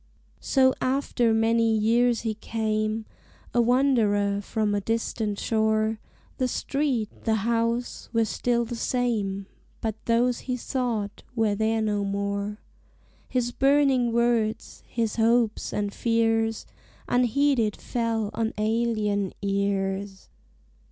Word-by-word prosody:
So 260 -1 +3
after 255 -3 +1
many 225 0 +3
years 235 +2 +2
he 225 -1 -1
came 215 0 -2 0.5
A 240 - +4
wanderer 225 -6 +2
from 210 0 -1
a 205 - 0
distant 225 -1 -2
shore: 220 0 +1 0.4
The 255 - +2
street, 260 -4 -1
the 220 -1 +2
house, 235 +1 -1
were 230 -1 +2
still 235 +2 0
the 240 +1 -5
same, 220 -5 -1 0.3
But 220 -1 -4
those 240 +1 +2
he 250 -1 -3
sought 235 -5 -2
were 220 -3 +2
there 220 +1 0
no 205 -1 0
more: 200 +1 -2 0.7
His 245 -1 0
burning 270 -3 +3
words, 235 -2 0
his 230 -2 -2
hopes 230 -1 +2
and 205 -1 -2
fears, 225 -1 +1 0.4
Unheeded 245 -2 +2
fell 225 -3 -2
on 220 +1 -1
alien 215 -3 0
ears. 195 0 -2
225 Hz, 115 wpm, -26 LUFS, 210-240 Hz, 0.7 s, A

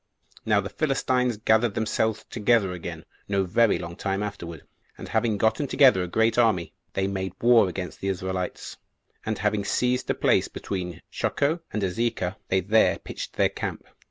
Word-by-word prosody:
1. - - -6
Now 105 -2 +5
the 100 - -5
Philistines 130 - 0
gathered 110 +1 +2
themselves 110 0 0
together 110 -3 +2
again 90 -2 -7 0.2
no 100 -1 +2
very 110 +5 +3
long 85 0 -7
time 95 +1 -2
afterward; 85 -6 -6 0.3
and - - -8
having 110 -3 +1
gotten 110 +7 +1
together 130 -9 +5
a 90 - -2
great 110 +6 +2
army, 110 -8 +2 0.2
they 95 - 0
made 95 -2 -3
war 115 -5 +5
against 90 -1 -6
the 95 - -2
Israelites; 95 -1 -3 0.5
and - - -1
having 105 -2 0
seized 125 +5 0
a - - +2
place - - +2
between 90 -3 -5
Shochoh 150 +4 0
and 105 - -2
Azekah, 95 -1 -1
they 95 0 +2
there 105 +4 +3
pitched - - -7
their - - +2
camp. - - -5
105 Hz, 170 wpm, -25 LUFS, 95-115 Hz, 0.5 s, Now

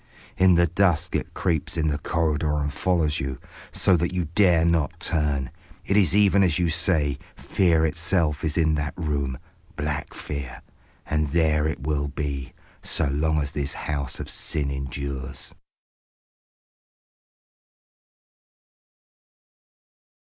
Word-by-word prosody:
In 95 -1 +5
the 85 0 +5
dusk 85 -2 +2
it - - -3
creeps 85 0 -1
in 80 -1 +1
the 75 0 -1
corridor 75 -1 0
and 75 0 -2
follows 80 -2 +1
you, 65 -1 -3 0.3
so 95 - +3
that 85 +2 0
you 90 -2 0
dare 90 -5 +4
not 85 -1 +1
turn. 75 -6 0 0.3
It 100 - +1
is 95 -4 +4
even 100 -1 +5
as 90 -3 +3
you 85 -2 +1
say. 80 -4 +1 0.2
Fear 85 -4 +2
itself 85 -2 0
is 80 0 -1
in 80 -2 +3
that 75 -2 -4
room. 70 -6 -2 0.4
Black 75 0 -3
Fear.... 70 -4 -6 0.4
And 75 0 0
there 80 0 +2
it 75 -4 -3
will 75 -2 0
be... 70 -2 -4 0.3
so 70 - 0
long 75 +3 +1
as 70 - -4
this 70 0 -3
house 70 -3 -3
of - - -5
sin 70 -2 -1
endures." 70 0 -5
75 Hz, 130 wpm, -25 LUFS, 70-85 Hz, 0.4 s, In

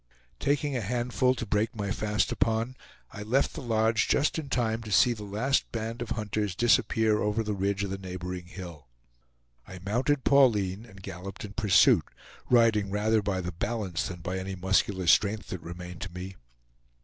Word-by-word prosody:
Taking 145 0 0
a 125 - -1
handful 125 +4 +1
to 115 - -4
break 110 +3 0
my 100 -2 -3
fast 105 0 0
upon, 115 +3 0 0.4
I 105 - -8
left 120 +6 +1
the - - -6
lodge 110 -2 +1
just 155 +4 +2
in 145 -3 -7
time 115 -3 0
to 110 -2 -8
see 120 +6 +5
the 105 -2 -8
last 110 +8 0
band 115 +1 -4
of 120 - -4
hunters 105 -3 -2
disappear 110 -1 +3
over 105 +2 0
the 105 -1 -2
ridge 100 0 -1
of 100 - -3
the 95 - -4
neighboring 90 -1 -6
hill. 85 -6 -9 0.8
I 95 - -9
mounted 125 +9 0
Pauline 110 -7 +3
and 95 -3 -15
galloped 95 +2 -7
in 100 - -10
pursuit, 105 -5 +4 0.4
riding 115 -5 +4
rather 105 +2 +2
by 95 -2 -1
the 90 0 -4
balance 95 -1 -2
than 90 -3 -7
by 90 +2 -3
any 95 +1 -5
muscular 95 0 +1
strength 105 +4 +3
that 90 - -5
remained 90 +1 -8
to 95 - -5
me. 90 +2 -7
105 Hz, 180 wpm, -28 LUFS, 95-115 Hz, 0.8 s, see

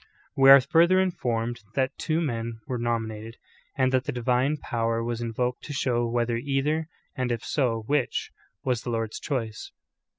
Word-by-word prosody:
"'^ 135 0 +6
\\'e - - +10
are 135 0 +11
further 170 +7 +4
informed 120 -10 -1
that 130 0 0
two 160 0 -1
men 115 -6 -3
were 125 -2 -3
nominated, 115 -1 -3 0.4
and 130 -1 +3
that 130 0 +2
the 145 - -1
divine 125 +3 +1
power 115 -3 -1
was 120 0 -3
invoked 125 +2 -2
to 145 - -6
show 120 -3 0
whether 120 0 0
either, 145 +5 0 0.3
and 125 -1 -1
if 120 -1 -3
so, 115 -6 0
which, 145 0 0 0.3
was 125 -3 0
the - - -5
Lord's 115 -2 -2
choice. 115 -6 -4
125 Hz, 170 wpm, -26 LUFS, 115-135 Hz, 0.4 s, are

